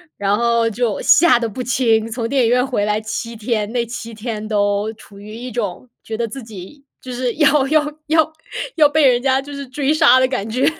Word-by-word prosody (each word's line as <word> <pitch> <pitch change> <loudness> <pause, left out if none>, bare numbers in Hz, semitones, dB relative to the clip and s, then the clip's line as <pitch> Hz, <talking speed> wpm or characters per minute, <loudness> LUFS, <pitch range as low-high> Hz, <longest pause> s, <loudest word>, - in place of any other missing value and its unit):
然 200 +1 0
后 235 -1 +2
就 225 -1 -2
吓 340 -6 +5
得 230 -2 -2
不 255 - -6
轻， 230 -3 +1
从 230 0 -3
电 265 -2 +2
影 225 - +2
院 250 +1 +2
回 240 -6 -1
来 210 +1 0
7 230 +1 -5
天， 215 -1 -2
那 240 -1 0
7 230 0 -7
天 215 -1 -5
都 205 0 0
处 205 -2 -16
于 210 +1 -11
一 245 +2 -7
种 215 +1 -4
觉 220 - -5
得 235 - -1
自 265 +4 -8
己 220 +5 -12 0.2
就 255 - -8
是 245 -1 -2
要 295 -2 +3
要 305 +1 +2 0.2
要 315 0 +2 0.4
要 305 -3 +6
被 295 0 +2
人 245 -2 +4
家 265 0 +2
就 285 +1 -10
是 280 -1 -7
追 275 +3 0
杀 310 -4 +5
的 260 - +4
感 225 -5 -3
觉。 255 +4 0
235 Hz, 230 characters per minute, -19 LUFS, 220-270 Hz, 0.4 s, 要